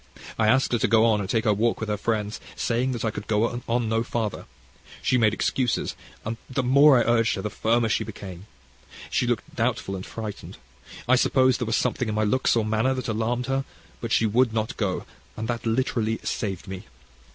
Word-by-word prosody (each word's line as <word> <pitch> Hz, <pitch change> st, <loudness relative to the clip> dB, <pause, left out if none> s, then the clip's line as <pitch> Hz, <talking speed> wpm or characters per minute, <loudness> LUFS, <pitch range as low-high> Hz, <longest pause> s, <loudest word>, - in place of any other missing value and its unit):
I 110 Hz, -, +3 dB
asked 130 Hz, +4 st, +3 dB
her 120 Hz, -, +2 dB
to -, -, +2 dB
go 115 Hz, 0 st, +5 dB
on 110 Hz, -2 st, +3 dB
and 110 Hz, +3 st, -1 dB
walk 115 Hz, +1 st, +1 dB
with 110 Hz, -, -3 dB
her 105 Hz, -, 0 dB
friends, 105 Hz, 0 st, -2 dB, 0.2 s
saying 125 Hz, +3 st, 0 dB
that 115 Hz, -2 st, -3 dB
I 110 Hz, -, +1 dB
could 105 Hz, -1 st, -7 dB
go 115 Hz, +3 st, 0 dB
no 115 Hz, -2 st, +1 dB
further. 115 Hz, -3 st, -3 dB, 0.6 s
She 125 Hz, -, +3 dB
made 110 Hz, -2 st, +4 dB
excuses, 120 Hz, +2 st, 0 dB, 0.3 s
and 115 Hz, +1 st, -3 dB
the 130 Hz, 0 st, -1 dB
more 140 Hz, +2 st, +6 dB
I 120 Hz, -, +4 dB
urged 115 Hz, -1 st, +2 dB
her 95 Hz, -, -5 dB
the 105 Hz, -, -3 dB
firmer 115 Hz, +3 st, +1 dB
she 110 Hz, -, +1 dB
became. 95 Hz, -3 st, -9 dB, 0.6 s
She 125 Hz, -, +1 dB
looked 120 Hz, -2 st, -2 dB
doubtful 115 Hz, -4 st, -1 dB
and 95 Hz, -, -5 dB
frightened. 110 Hz, -1 st, -7 dB, 0.5 s
I 130 Hz, -, +6 dB
suppose 130 Hz, 0 st, +3 dB
there 120 Hz, -, -2 dB
was 115 Hz, -, +1 dB
something 125 Hz, -, 0 dB
in 105 Hz, -, -2 dB
my 110 Hz, -, +1 dB
looks 130 Hz, +5 st, +2 dB
or 115 Hz, -2 st, +1 dB
manner 110 Hz, +5 st, +1 dB
that 130 Hz, -2 st, -4 dB
alarmed 115 Hz, +3 st, -1 dB
her; 135 Hz, +1 st, 0 dB, 0.4 s
but 115 Hz, -, -4 dB
she 115 Hz, -, +3 dB
would 115 Hz, +3 st, +3 dB
not 110 Hz, +2 st, -1 dB
go, 95 Hz, -5 st, -2 dB, 0.3 s
and 110 Hz, +1 st, -3 dB
that 120 Hz, 0 st, -3 dB
literally 115 Hz, -1 st, 0 dB
saved 100 Hz, -3 st, -3 dB
me. 95 Hz, -1 st, -7 dB
115 Hz, 205 wpm, -25 LUFS, 110-120 Hz, 0.6 s, more